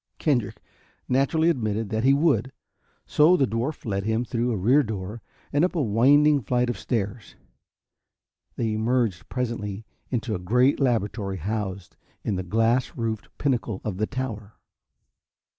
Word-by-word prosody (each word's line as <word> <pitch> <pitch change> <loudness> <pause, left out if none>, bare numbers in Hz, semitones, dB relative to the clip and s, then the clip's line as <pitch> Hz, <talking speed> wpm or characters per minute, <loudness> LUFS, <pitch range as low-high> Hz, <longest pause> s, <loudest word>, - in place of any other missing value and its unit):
Kendrick 120 -10 0 0.5
naturally 140 +5 +2
admitted 110 -8 0
that 110 +1 0
he 135 - +5
would, 140 -4 +2 0.5
so 160 +5 +5
the 135 - +3
dwarf 120 +7 -3
led 100 -3 -1
him 110 +3 0
through 120 +1 -1
a 110 - -1
rear 125 +10 +4
door 105 -2 -5 0.3
and 145 +3 +3
up 180 - +1
a 165 - +1
winding 140 +6 +4
flight 125 +3 +1
of - - -7
stairs. 110 -1 -3 1.2
They 115 -2 -1
emerged 110 -4 0
presently 115 -4 -3 0.2
into 120 -2 -2
a 95 - -2
great 125 +9 +2
laboratory 105 -6 0
housed 100 0 -4 0.3
in 105 - -1
the 90 - -2
glass 115 +7 +1
roofed 115 -2 -3
pinnacle 120 -7 -1
of 100 -4 -3
the 110 +1 0
tower. 110 -6 -5
115 Hz, 145 wpm, -25 LUFS, 105-130 Hz, 1.2 s, he